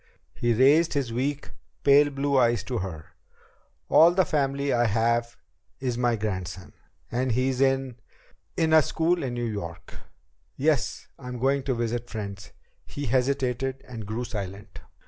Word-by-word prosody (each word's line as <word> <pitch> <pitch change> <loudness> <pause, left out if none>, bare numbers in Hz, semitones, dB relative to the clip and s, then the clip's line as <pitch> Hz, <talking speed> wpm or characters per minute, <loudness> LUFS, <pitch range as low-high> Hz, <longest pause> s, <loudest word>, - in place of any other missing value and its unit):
He 120 - 0
raised 145 +7 +4
his 130 -5 -1
weak, 140 +4 -2 0.3
pale 145 +1 +6
blue 140 0 -1
eyes 120 -5 +3
to 125 -3 -3
hers. 80 -5 -6 0.8
"All 165 +2 +7
the 180 +1 +2
family 140 -2 0
I 120 0 +3
have 115 +2 0 0.4
is 125 -2 -2
my 120 -1 +1
grandson. 95 -4 -5 0.4
And 125 0 0
he's 130 +1 0
in 135 -2 +1 0.6
in 160 -1 +2
a 160 - +8
school 165 +4 0
in 125 -4 -3
New 120 0 -2
York. 85 -6 -6 0.6
Yes, 145 +1 0
I'm 125 -2 -6
going 135 +3 +1
to 130 - 0
visit 120 +1 -3
friends." 100 -4 -7 0.4
He 145 - -5
hesitated 130 +1 0
and 115 -5 -7
grew 110 +4 -3
silent. 100 -3 -7
125 Hz, 145 wpm, -26 LUFS, 115-140 Hz, 0.8 s, a